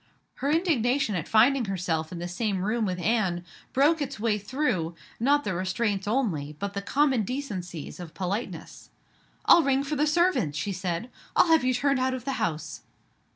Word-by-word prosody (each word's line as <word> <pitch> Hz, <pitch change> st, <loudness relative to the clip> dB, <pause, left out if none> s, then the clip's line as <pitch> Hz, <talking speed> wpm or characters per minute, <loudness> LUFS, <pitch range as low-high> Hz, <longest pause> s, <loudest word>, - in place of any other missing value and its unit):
Her 275 Hz, -, -1 dB
indignation 275 Hz, -, +2 dB
at 170 Hz, -5 st, -3 dB
finding 240 Hz, +3 st, +4 dB
herself 175 Hz, -5 st, -2 dB
in 180 Hz, -, -6 dB
the 175 Hz, +1 st, -4 dB
same 190 Hz, +1 st, -2 dB
room 220 Hz, 0 st, 0 dB
with 180 Hz, -1 st, -2 dB
Anne 180 Hz, -3 st, 0 dB, 0.3 s
broke 300 Hz, +4 st, +3 dB
its 275 Hz, -4 st, -4 dB
way 215 Hz, -1 st, +1 dB
through, 195 Hz, -, -1 dB, 0.2 s
not 285 Hz, +5 st, +3 dB
the 200 Hz, -, -2 dB
restraints 190 Hz, +2 st, -1 dB
only, 190 Hz, -, 0 dB
but 200 Hz, +4 st, -4 dB
the 200 Hz, -, -3 dB
common 270 Hz, +3 st, +2 dB
decencies 190 Hz, -, -5 dB
of 175 Hz, -3 st, -9 dB
politeness. 195 Hz, +5 st, -5 dB, 0.6 s
"I'll 345 Hz, -, +8 dB
ring 275 Hz, -2 st, +2 dB
for 285 Hz, +2 st, -3 dB
the 300 Hz, +1 st, +2 dB
servants!" 300 Hz, -, +2 dB
she 200 Hz, -, -2 dB
said. 180 Hz, +4 st, -3 dB, 0.2 s
"I'll 350 Hz, -, +5 dB
have 325 Hz, -3 st, +5 dB
you 255 Hz, 0 st, +2 dB
turned 275 Hz, +1 st, +2 dB
out 260 Hz, 0 st, +1 dB
of 250 Hz, -2 st, -8 dB
the 275 Hz, -, -1 dB
house." 155 Hz, -6 st, -3 dB
220 Hz, 180 wpm, -27 LUFS, 180-275 Hz, 0.6 s, I'll